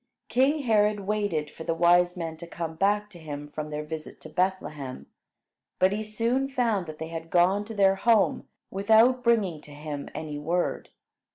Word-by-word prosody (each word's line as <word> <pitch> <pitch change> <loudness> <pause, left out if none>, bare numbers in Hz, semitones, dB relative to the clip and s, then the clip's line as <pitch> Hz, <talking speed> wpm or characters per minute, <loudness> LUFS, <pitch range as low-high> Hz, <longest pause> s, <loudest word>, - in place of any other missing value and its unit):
King 280 +4 +2
Herod 210 -3 +3
waited 195 -7 -1
for 160 - -9
the 165 - -1
wise 175 +1 +4
men 165 -2 -4
to 170 +1 -9
come 165 -1 -5
back 205 +5 +1
to 175 - -11
him 145 -2 -7
from 150 +1 -6
their 150 0 -4
visit 155 0 -7
to 155 - -10
Bethlehem; 155 -6 -2 0.7
but 185 +1 +4
he 210 +2 -2
soon 230 +5 -1
found 230 -9 0
that 155 -1 -8
they 160 +1 -6
had 165 0 -6
gone 185 +4 +3
to 225 +1 -8
their 195 -1 +4
home 225 0 +2 0.2
without 225 +6 +4
bringing 200 -10 +2
to - - -15
him 145 -1 -6
any 150 -2 -5
word. 170 +4 -1
180 Hz, 180 wpm, -27 LUFS, 160-210 Hz, 0.7 s, wise